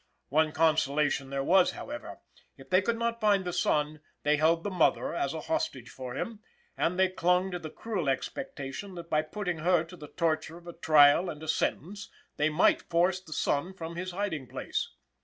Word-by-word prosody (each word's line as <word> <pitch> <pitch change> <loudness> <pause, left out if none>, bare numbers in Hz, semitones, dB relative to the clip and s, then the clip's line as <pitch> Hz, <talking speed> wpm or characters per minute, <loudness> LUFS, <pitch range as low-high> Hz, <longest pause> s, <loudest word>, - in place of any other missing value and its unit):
One 155 +2 +3
consolation 150 -3 +2
there 135 0 -2
was, 185 +5 +4
however 295 +1 -8 0.4
if - - -15
they 185 +1 +5
could 230 +4 0
not 235 0 -2
find 200 -3 +3
the 175 - -3
son, 150 -1 0 0.2
they 150 0 +3
held 165 +2 +3
the 205 - -3
mother 180 -3 +2
as 140 -5 -1
a 160 - -4
hostage 125 -6 -3
for 125 -2 -7
him, 225 -2 -4 0.4
and 180 +2 0
they 190 0 +5
clung 180 +1 +1
to 180 - -3
the 160 -2 -7
cruel 190 -6 -3
expectation 155 - -4
that 170 -1 -9
by 155 - +3
putting 175 +2 -4
her 175 0 +3
to 170 +2 -12
the 150 -4 -10
torture 160 0 -1
of 175 - -16
a 170 - -8
trial 155 +1 +5
and 150 -1 -7
a - - -7
sentence, 200 +6 -2 0.3
they 150 +1 +2
might 155 +4 +2
force 180 +2 +2
the 185 -4 -16
son 170 +5 -1
from 165 -2 -6
his 185 +2 -4
hiding 175 -8 -3
place. - - -3
170 Hz, 195 wpm, -29 LUFS, 150-185 Hz, 0.4 s, they